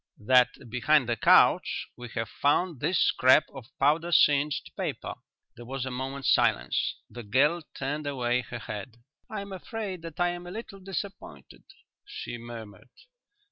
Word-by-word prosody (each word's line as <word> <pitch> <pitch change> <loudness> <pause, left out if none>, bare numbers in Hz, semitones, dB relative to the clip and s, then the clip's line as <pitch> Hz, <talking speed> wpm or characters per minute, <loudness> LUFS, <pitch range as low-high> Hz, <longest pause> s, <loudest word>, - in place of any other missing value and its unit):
"That 125 +1 +3
behind 125 +3 +2
the 120 - +1
couch - - +4
we 120 -1 -9
have 115 -1 -2
found 145 - +1
this 185 - +1
scrap 130 +4 +5
of 130 -4 -10
powder 155 +5 +2
singed 145 -2 +3
paper." - - -4 0.4
There 120 - -11
was 135 0 -4
a 130 - -4
moment's 130 +1 0
silence. - - +1
The 120 - -9
girl 140 +10 +2
turned 145 +2 -3
away 125 -3 0
her 120 - -7
head. 110 0 -7 0.3
"I 215 -3 -4
am 200 0 -9
afraid 190 -1 -5
that 165 -1 -9
I 175 0 +3
am 175 0 -6
a - - -7
little 210 -1 -8
disappointed," 195 +1 -7 0.4
she 120 - -7
murmured. 115 -3 -10
140 Hz, 155 wpm, -28 LUFS, 120-175 Hz, 0.4 s, scrap